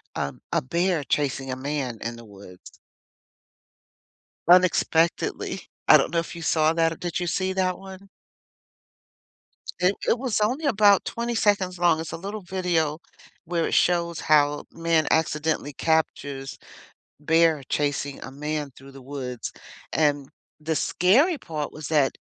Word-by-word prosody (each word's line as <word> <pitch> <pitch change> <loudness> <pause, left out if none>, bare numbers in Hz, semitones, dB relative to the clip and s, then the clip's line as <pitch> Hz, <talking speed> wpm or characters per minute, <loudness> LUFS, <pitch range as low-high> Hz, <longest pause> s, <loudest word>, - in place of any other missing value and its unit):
um, 70 -2 -3
a - - +2
bear 170 +3 0
chasing 140 -2 -1
a - - -2
man 130 -3 -3
in 115 +1 -4
the 115 - -12
woods? 100 -3 -14 1.7
Unexpectedly. 170 -1 +2 0.2
I - - +10
don't - - +1
know 170 - +2
if 170 - -8
you 170 - -7
saw 160 -1 +2
that 165 -1 +1
did 175 -1 -3
you 175 - -2
see 185 +2 -1
that 185 -1 0
one? 190 +1 -12 1.7
It 180 +3 +3
it 235 - +3
was 250 -5 -1
only 255 +9 0
about 205 -5 +4
20 235 0 -3
seconds 195 -4 +1
long 170 -2 +3
it's 160 - -6
a - - -3
little 200 +5 -6
video 175 -4 -1 0.5
where 170 0 -1
it - - -1
shows 170 -1 +2
how 145 -1 +2
man 165 -1 +1
accidentally 155 -2 0
captures 140 -3 -1 0.6
bear 160 -1 +3
chasing 145 -1 -1
a 130 - -7
man 150 +1 -4
through 135 +1 -14
the 135 - -12
woods, 130 -3 -6 0.4
and 145 -3 +1 0.3
the 160 +1 -2
scary 235 - +3
part 155 - -5
was 155 -2 -7
that, 145 -4 +3
160 Hz, 145 wpm, -25 LUFS, 145-180 Hz, 1.7 s, I